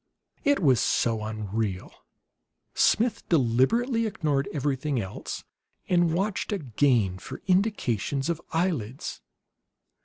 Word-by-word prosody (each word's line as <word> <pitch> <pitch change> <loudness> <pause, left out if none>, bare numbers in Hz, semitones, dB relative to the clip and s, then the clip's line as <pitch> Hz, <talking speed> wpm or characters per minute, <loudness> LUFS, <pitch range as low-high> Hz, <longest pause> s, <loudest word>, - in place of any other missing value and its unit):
It 285 -1 +3
was 135 - +4
so 115 -2 +1
unreal. 110 -2 -3 0.8
Smith 235 +1 +2
deliberately 185 - +2
ignored 145 -9 -1
everything 140 -1 -1
else 95 -2 -5 0.4
and 175 -2 +3
watched 195 +6 -1
again 120 - +1
for - - -9
indications 165 - +1
of 170 -1 -1
eyelids. 155 - -2
140 Hz, 95 wpm, -27 LUFS, 115-185 Hz, 0.8 s, was